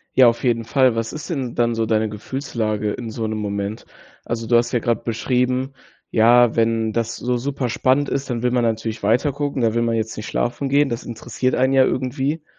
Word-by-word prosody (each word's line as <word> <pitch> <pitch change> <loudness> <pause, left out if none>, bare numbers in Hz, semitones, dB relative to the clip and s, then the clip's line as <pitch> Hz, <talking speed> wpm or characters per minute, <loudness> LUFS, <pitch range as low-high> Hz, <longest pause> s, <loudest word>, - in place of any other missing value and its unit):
Ja, 130 -2 +7
auf 115 0 +1
jeden 115 -3 +1
Fall. 130 0 +3
Was 115 0 -2
ist 155 - -7
denn 135 -8 -3
dann 120 0 +2
so 115 0 0
deine 110 0 +1
Gefühlslage 110 -2 -3
in 115 +1 -5
so 110 0 -3
'nem 110 0 -2
Moment? 100 0 -4 0.4
Also, 115 -1 -3
du 120 +1 +4
hast 120 0 0
ja 120 - +3
gerade 115 -1 0
beschrieben: 125 +3 0 0.4
„Ja, 120 +1 +5
wenn 115 -1 +1
das 115 +1 -2
so 125 0 -1
super 130 0 -2
spannend 130 +4 +1
ist, 135 0 -2
dann 120 -1 -2
will 125 - +2
man 120 -1 +2
natürlich 110 -1 -2
weiter 120 +7 +2
gucken. 145 -1 -3
Da 115 -2 +2
will 115 - +1
man 115 -1 0
jetzt 110 0 -3
nicht 105 - -6
schlafen 125 +3 -2
gehen. 140 +1 +3
Das 115 -1 -4
interessiert 120 +2 -2
einen 130 +1 +2
ja 135 -1 +5
irgendwie.“ 135 +5 -2
120 Hz, 220 wpm, -21 LUFS, 115-130 Hz, 0.4 s, Ja